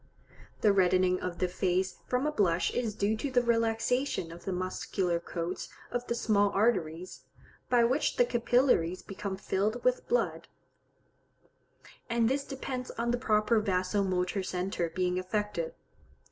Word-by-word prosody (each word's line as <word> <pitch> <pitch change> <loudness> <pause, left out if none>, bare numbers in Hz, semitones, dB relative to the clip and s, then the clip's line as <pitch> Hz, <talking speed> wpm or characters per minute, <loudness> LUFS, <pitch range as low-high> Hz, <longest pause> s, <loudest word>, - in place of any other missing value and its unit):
The 210 -2 +5
reddening 185 -1 +3
of 180 -1 -4
the 185 - +1
face 185 +1 0
from 250 +3 0
a 300 - +1
blush 180 - +2
is 230 -4 -1
due 210 +1 +1
to 280 - -2
the 250 -2 +2
relaxation 230 -3 0
of 170 - -11
the 195 - -2
muscular 185 -1 -1
coats 170 +1 -4 0.2
of 245 0 -3
the 235 - -1
small 205 -3 +2
arteries, 185 -5 0 0.4
by 245 -1 +5
which 255 +6 +1
the 245 - +4
capillaries 240 -7 +2
become 195 0 -5
filled 205 +5 -1
with - - +1
blood; - - 0 1.6
and 235 -1 +2
this 275 +2 0
depends 260 -2 -5
on 235 +1 -2
the 245 - 0
proper 220 -1 +3
vaso 190 -1 0
motor 185 +1 0
centre 180 -2 -2
being 180 +1 0
affected. 185 -3 -2
205 Hz, 145 wpm, -30 LUFS, 185-240 Hz, 1.6 s, The